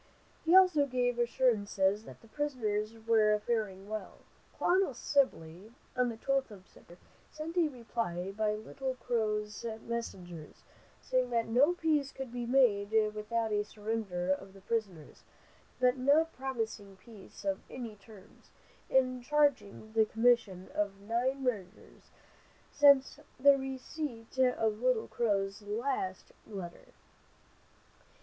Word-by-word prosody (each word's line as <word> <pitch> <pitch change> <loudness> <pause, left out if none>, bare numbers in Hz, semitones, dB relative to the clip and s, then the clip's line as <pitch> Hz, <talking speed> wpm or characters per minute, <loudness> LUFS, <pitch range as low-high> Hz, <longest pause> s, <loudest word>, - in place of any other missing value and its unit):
He 335 +2 +4
also 360 -7 +6
gave 245 -2 0
assurances 215 -4 +1
that - - -12
the 230 - -17
prisoners 225 -6 -2
were 215 -2 +4
faring 210 -3 -2
well. 215 0 -6 0.4
Colonel 365 -7 +2
Sibley, 210 - -1 0.2
on 250 -1 +2
the 230 - -6
12th 270 +2 0
of 195 -3 -13
September, 175 +1 -17 0.3
sent 310 +2 -6
a 345 -3 +4
reply 230 - -4
by 210 +1 0
Little 260 +5 -5
Crow's 215 -3 -2 0.2
messengers, 180 -9 -6 0.4
saying 255 -1 +1
that 230 -1 +1
no 260 +9 +4
peace 305 -5 0
could 265 -3 -7
be 240 -1 -4
made 235 -6 +3 0.2
without 220 +1 -2
a 210 0 +1
surrender 210 -4 -3
of 190 0 -3
the 195 - -15
prisoners, 195 -7 -4 0.6
but 250 +1 +3
not 295 +5 +3
promising 225 -6 -4
peace 200 0 -14
on 195 -1 -1
any 235 -4 -7
terms, 200 -1 -17 0.4
and 255 -1 +2
charging 260 -7 +1
the 220 -1 +4
commission 225 -5 +2
of 200 -1 -1
nine 245 +6 -1
murders 210 -6 -5 0.6
since 280 -1 +5 0.2
the 280 +1 +7
receipt 265 -2 -6
of 225 -4 +2
Little 250 -3 +1
Crow's 200 -3 -1
last 210 -2 -3 0.2
letter. 190 -5 -8
230 Hz, 125 wpm, -32 LUFS, 205-260 Hz, 0.6 s, the